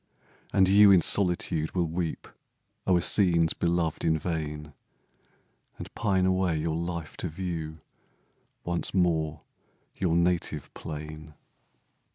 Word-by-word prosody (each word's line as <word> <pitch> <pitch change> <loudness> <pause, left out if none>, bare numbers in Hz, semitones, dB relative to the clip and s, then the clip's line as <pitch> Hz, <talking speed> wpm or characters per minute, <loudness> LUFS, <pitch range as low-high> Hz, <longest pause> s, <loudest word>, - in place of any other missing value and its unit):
And 95 -1 +4
you 100 +2 +7
in 95 -3 +6
solitude 90 -4 +1
will 90 -2 +1
weep 85 0 -4 0.6
O'er 90 -2 +3
scenes 85 -4 +4
beloved 85 -2 -1
in 80 -1 +2
vain, 75 -2 -5 1.0
And - - -9
pine 95 -4 +1
away 95 -3 +1
your 80 +1 -2
life 85 -1 -5
to - - -3
view 80 -2 -5 0.9
Once 85 +2 -3
more 80 -4 0 0.6
your 90 -3 +1
native 85 -3 -1
plain. 75 0 -8
85 Hz, 115 wpm, -27 LUFS, 80-90 Hz, 1.0 s, you